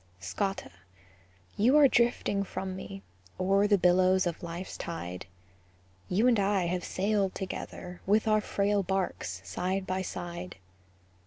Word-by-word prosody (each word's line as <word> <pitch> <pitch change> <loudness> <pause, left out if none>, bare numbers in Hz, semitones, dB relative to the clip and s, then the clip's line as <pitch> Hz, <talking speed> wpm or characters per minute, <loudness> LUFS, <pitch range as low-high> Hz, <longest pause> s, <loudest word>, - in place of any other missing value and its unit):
Scotta, 100 - -3 0.8
you 245 +8 +4
are 290 -2 +8
drifting 235 -5 +2
from 190 -1 -5
me, 195 +1 -8 0.4
O'er 195 +2 +3
the 205 -1 +4
billows 185 +1 +4
of 175 +1 -3
life's 175 +1 -6
tide; 90 - -6 0.8
You 205 +6 +2
and 235 -4 +4
I 195 -2 +2
have 180 +1 -1
sailed 200 0 0
together, 180 -1 -6
With 210 +3 +3
our 215 0 +4
frail 205 0 +1
barks 180 - -2
side 185 - -2
by 185 0 -1
side. 175 0 -6
190 Hz, 135 wpm, -29 LUFS, 180-200 Hz, 0.8 s, are